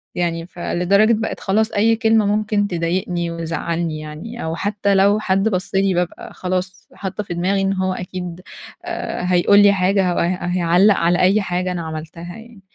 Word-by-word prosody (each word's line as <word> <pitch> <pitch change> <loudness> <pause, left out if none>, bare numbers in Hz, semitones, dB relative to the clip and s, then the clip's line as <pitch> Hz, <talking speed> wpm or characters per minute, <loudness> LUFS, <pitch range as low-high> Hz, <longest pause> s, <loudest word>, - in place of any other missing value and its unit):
يعني 165 -1 -1
فلدرجة 190 +5 +1
بقت 220 +1 -2
خلاص 215 +3 +1
أي 225 +2 +3
كلمة 225 -1 +3
ممكن 210 0 +1
تضايقني 175 0 -2
وزعلني 165 -1 -3
يعني، 155 +11 -8
أو 160 0 -3
حتى 200 0 0
لو 200 +2 +4
حد 195 +1 +1
بص 185 -1 -3
لي، 195 -1 +2
بابقى 175 0 -3
خلاص، 185 +1 -4
حاطة 200 +1 -5
في 180 - -6
دماغي 190 +3 0
إن 195 0 +1
هو 185 0 -1
أكيد 180 -1 -6 0.4
آآ، - - -4
هيقول 200 +3 +5
لي 205 0 +6
حاجة 190 0 +2
أو - - -1
هي 180 +1 0
هيعلق 180 +3 +3
على 175 +1 +1
أي 195 +4 +4
حاجة 180 -1 -2
أنا 175 -1 -3
عملتها 165 +4 -7
يعني. 225 -3 -14
185 Hz, 175 wpm, -20 LUFS, 175-205 Hz, 0.4 s, لي